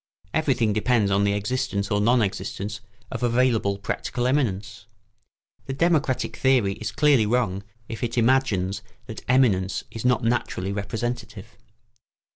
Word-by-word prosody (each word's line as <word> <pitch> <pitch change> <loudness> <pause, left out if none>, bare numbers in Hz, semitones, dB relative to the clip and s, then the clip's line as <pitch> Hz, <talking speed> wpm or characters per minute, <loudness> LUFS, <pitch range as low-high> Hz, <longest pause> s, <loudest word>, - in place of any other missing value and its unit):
Everything 125 -8 +1
depends 110 -1 +2
on 100 +1 +3
the 100 - +2
existence 105 -1 -2
or 105 0 +2
non 120 +2 +4
existence 100 +1 -4 0.3
of - - -4
available 120 -4 +2
practical 120 +4 -3
eminence. 105 -7 -1 0.8
The 135 - -3
democratic 150 -3 +1
theory 125 -7 +3
is 110 +2 -5
clearly 145 -5 +3
wrong 105 -5 0 0.3
if 115 -1 -6
it 120 0 -2
imagines 110 -6 +2 0.2
that 110 - -8
eminence 110 -7 +2
is 115 - -6
not 125 -1 +2
naturally 115 -5 -1
representative. 110 +4 -5
115 Hz, 130 wpm, -24 LUFS, 100-125 Hz, 0.8 s, non